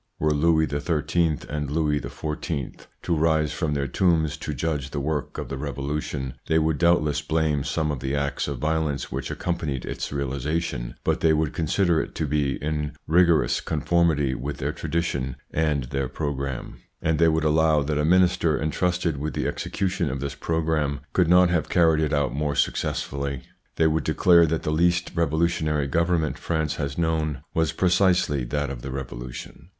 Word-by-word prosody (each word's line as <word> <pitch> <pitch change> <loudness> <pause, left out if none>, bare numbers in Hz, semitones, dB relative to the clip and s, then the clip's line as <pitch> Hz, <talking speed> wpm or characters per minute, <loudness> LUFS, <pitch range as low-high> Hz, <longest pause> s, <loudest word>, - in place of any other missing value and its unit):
Were 75 0 +1
Louis 80 +1 +3
XIII. 80 +2 0
and 75 -1 -3
Louis 75 -1 +1
XIV. 75 +2 -5 0.2
to 85 - +1
rise 80 -1 +2
from 75 -3 -1
their 70 -1 0
tombs 80 +2 +1
to 75 - -5
judge 75 -1 -2
the 70 - -3
work 75 +1 -3
of - - -4
the 70 - -4
Revolution, 70 -1 -3
they 80 - +3
would 80 -2 +1
doubtless 75 -4 +3
blame 75 -2 0
some 75 0 -1
of 70 - -3
the 65 +2 -2
acts 70 0 -1
of 70 -2 -3
violence 75 0 -1
which - - -4
accompanied 80 -7 -3
its - - -4
realisation, 70 -1 -2
but - - +1
they 80 -1 +4
would 75 -1 0
consider 85 +1 +2
it - - -7
to 80 - -1
be 70 -2 0
in 75 -1 -2
rigorous 80 -5 +3
con 75 -2 -3
formity 80 -6 +2
with 70 +3 -4
their - - -2
tradition 70 -7 -2 0.2
and 75 -3 +1
their 70 -2 -1
programme, 70 -3 -4 0.2
and 80 -2 0
they 85 - +5
would 80 -1 +2
allow 80 -1 +3
that 75 +1 -1
a - - +1
minister 85 -1 +3
entrusted 85 0 0
with 75 +3 -4
the - - -1
execution 90 -4 -2
of 65 +1 -3
this 70 +1 -3
programme 75 -2 -1
could 90 -3 +3
not 90 +1 +5
have 85 -3 0
carried 80 -3 +4
it 75 - 0
out 70 -2 +1
more 75 0 -1
successfully. 70 -2 -1 0.3
They 80 - +2
would 80 0 +2
declare 85 +1 +5
that 80 +1 -1
the 75 - -1
least 85 +2 +2
revolutionary 80 -2 +1
government 85 +2 0
France 80 -3 -1
has 70 -1 -3
known 80 -4 -1
was 80 -1 +1
precisely 90 -7 +2
that 75 +2 -2
of - - -7
the 70 - -6
Revolution. 65 +4 -7
75 Hz, 175 wpm, -25 LUFS, 70-80 Hz, 0.3 s, they